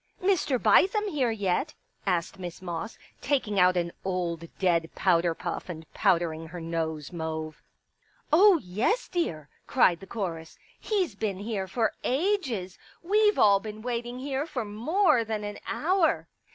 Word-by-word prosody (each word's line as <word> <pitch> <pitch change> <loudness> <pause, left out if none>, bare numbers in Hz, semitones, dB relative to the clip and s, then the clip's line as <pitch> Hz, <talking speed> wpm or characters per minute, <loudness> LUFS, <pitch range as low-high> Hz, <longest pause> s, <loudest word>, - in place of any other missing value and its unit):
" - - -23
Mr. 370 -8 +2
Bithem 390 - +4
here 275 -8 +1
yet? 205 -5 -1 0.2
" - - -47
asked 180 +1 0
Miss 175 -2 -6
Moss, 175 +3 -5 0.2
taking 245 -8 0
out 180 0 +5
an 170 -1 0
old 175 -3 -2
dead 170 -3 +2
powder 170 -2 +2
puff - - -5
and 160 -2 -7
powdering] 165 -2 +1
her 175 +2 -8
nose 160 -2 -3
mauve. 160 -2 -4 0.4
" - - -43 0.3
Oh, 385 +3 +7
yes, 220 - 0
dear," 165 - -2 0.2
cried 180 -10 +4
the 195 - -12
chorus. 170 -7 -5
*' - - -33
He's 385 - +1
been 200 -2 -2
here 200 -1 -3
for 220 +3 0
ages. 265 - -1 0.2
We've 420 +3 +3
all 200 -2 +6
been 215 +1 -8
waiting 240 0 -3
here 275 +3 -3
for 255 -8 -3
more 265 - +2
than 220 -1 -3
an 205 0 -5
hour." 360 +1 +1
205 Hz, 160 wpm, -27 LUFS, 175-270 Hz, 0.4 s, Oh